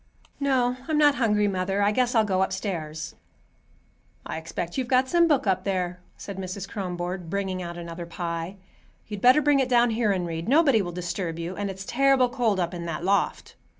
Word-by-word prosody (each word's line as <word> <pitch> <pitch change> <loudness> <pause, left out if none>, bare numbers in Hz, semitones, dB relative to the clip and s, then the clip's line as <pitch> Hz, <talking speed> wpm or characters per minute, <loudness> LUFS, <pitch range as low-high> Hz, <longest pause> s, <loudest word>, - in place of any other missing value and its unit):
"No, 255 -3 +1
I'm 310 -2 +1
not 295 -1 +6
hungry, 210 -2 +3
mother. 195 +1 0
I 205 - +3
guess 250 +2 +1
I'll 225 - +5
go 190 -2 +1
upstairs." 165 -6 -3 1.1
"I - - -4
expect 165 +1 -5
you've 260 -2 -1
got 255 +1 +3
some 340 +3 +4
book 290 -7 +2
up 190 -3 +1
there," 180 -2 -2 0.2
said 200 -2 -8
Mrs. 190 +1 -5
Kronborg, 180 -3 -4
bringing 190 -1 -2
out 175 -1 -6
another 170 0 -7
pie. 170 +1 -4 0.5
"You'd 210 -2 -7
better 255 +5 +6
bring 290 -1 +4
it 260 -1 +1
down 240 -1 +4
here 220 -2 +1
and 185 -2 -1
read. 165 +3 -4
Nobody'll 265 - +4
disturb 175 -1 -4
you, 170 +2 -5
and 200 +1 -3
it's 190 0 -7
terrible 270 +1 +3
cold 230 -5 0
up 175 0 -1
in 170 -1 -5
that 165 0 -4
loft." 200 +2 0
195 Hz, 190 wpm, -26 LUFS, 175-245 Hz, 1.1 s, not